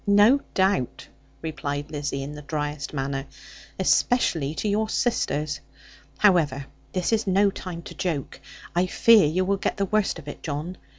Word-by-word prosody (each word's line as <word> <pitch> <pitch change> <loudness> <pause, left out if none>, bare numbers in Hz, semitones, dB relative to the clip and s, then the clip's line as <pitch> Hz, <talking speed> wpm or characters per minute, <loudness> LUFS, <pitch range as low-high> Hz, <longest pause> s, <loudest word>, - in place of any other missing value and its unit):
'No 205 +7 +6 0.2
doubt,' 190 -10 +1 0.4
replied 145 -2 -4
Lizzie, 145 -2 -3
in 145 +2 -6
the 150 - -8
driest 150 -1 -3
manner; 135 -1 -3 0.5
'especially 160 - +2
to 215 - -2
your 215 +2 +1
sisters. 155 - 0 0.6
However 155 -9 +3 0.3
this 185 +4 0
is 220 -2 +1
no 195 +1 +4
time 175 -3 -7
to - - -9
joke. 165 -7 -3 0.3
I 180 +1 +3
fear 220 -2 +6
you 180 +5 +1
will 200 +1 +1
get - - -2
the 200 - +1
worst 215 -1 +1
of 155 -3 -11
it, 145 - -7
John. 155 +5 -4
165 Hz, 160 wpm, -25 LUFS, 145-200 Hz, 0.6 s, No